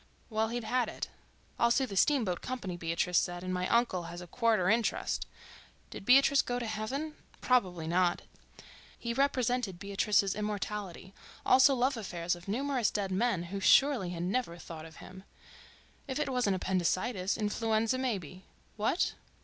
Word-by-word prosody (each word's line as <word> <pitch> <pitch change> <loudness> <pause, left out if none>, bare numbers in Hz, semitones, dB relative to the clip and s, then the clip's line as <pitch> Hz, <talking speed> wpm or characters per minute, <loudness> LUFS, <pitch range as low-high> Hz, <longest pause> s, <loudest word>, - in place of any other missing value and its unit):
Well, 220 0 +1
he'd 240 +1 -3
had 250 +2 0
it—I'll 235 - -4
sue 265 +3 +2
the 205 -6 -7
steamboat 220 - +2
company, 235 -8 -4
Beatrice 170 +1 +1
said, 175 0 -3
and 185 0 -3
my 180 0 -1
uncle 230 -7 +1
has 170 +1 -7
a 180 - -8
quarter 220 -1 +1
interest—did 220 -2 -3
Beatrice 275 +2 +6
go 245 - -3
to 245 - -3
heaven?... 240 +8 -3 0.3
probably 185 -10 +1
not—He 180 +6 -3
represented 250 -6 0
Beatrice's 200 0 +1
immortality, 205 -3 -4 0.3
also 265 +2 +6
love 255 +1 +1
affairs 175 -5 -2
of 175 +1 -14
numerous 255 +2 0
dead 200 -2 -2
men 190 -2 +1
who 200 - -2
surely 255 -1 +4
had 175 -1 -4
never 185 -2 -1
thought 165 -2 -9
of 160 -1 -13
him... 190 0 -12 0.8
if 265 -1 -3
it 300 -2 -1
wasn't 245 -7 +1
appendicitis, 185 +2 0
influenza 220 +2 0
maybe. 190 - -4 0.3
What? 220 - +1
210 Hz, 145 wpm, -31 LUFS, 180-245 Hz, 0.8 s, Beatrice